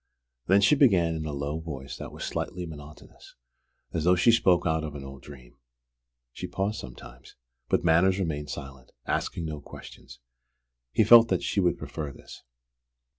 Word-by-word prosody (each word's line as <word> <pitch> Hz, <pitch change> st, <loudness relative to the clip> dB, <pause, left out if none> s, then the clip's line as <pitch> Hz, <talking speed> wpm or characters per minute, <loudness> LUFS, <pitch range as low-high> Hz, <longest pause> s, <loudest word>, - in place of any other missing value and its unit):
Then 95 Hz, +2 st, +5 dB
she 115 Hz, +8 st, +5 dB
began 95 Hz, -, +4 dB
in 80 Hz, -1 st, -4 dB
a -, -, -3 dB
low 70 Hz, +2 st, -3 dB
voice 70 Hz, -5 st, -7 dB
that -, -, -8 dB
was -, -, -8 dB
slightly 90 Hz, -1 st, -4 dB
monotonous, 75 Hz, -2 st, -13 dB, 0.6 s
as 80 Hz, -, -1 dB
though 90 Hz, +2 st, +4 dB
she 105 Hz, +7 st, +4 dB
spoke 95 Hz, -6 st, +3 dB
out 80 Hz, -1 st, 0 dB
of 75 Hz, -2 st, -6 dB
an 70 Hz, -, -7 dB
old 70 Hz, -1 st, -10 dB
dream. 65 Hz, -4 st, -14 dB, 0.8 s
She -, -, -6 dB
paused 100 Hz, +3 st, -2 dB
sometimes; 60 Hz, -1 st, -12 dB, 0.3 s
but -, -, +1 dB
Manners 90 Hz, +3 st, +4 dB
remained 75 Hz, -6 st, -3 dB
silent, 70 Hz, -3 st, -9 dB
asking 85 Hz, -, -2 dB
no 75 Hz, -2 st, -5 dB
questions. -, -, -12 dB, 0.7 s
He 110 Hz, -, +3 dB
felt 115 Hz, +2 st, +8 dB
that 95 Hz, -5 st, -1 dB
she -, -, -1 dB
would 90 Hz, -4 st, +2 dB
prefer 75 Hz, -3 st, -6 dB
this. -, -, -13 dB
80 Hz, 170 wpm, -27 LUFS, 70-95 Hz, 0.8 s, felt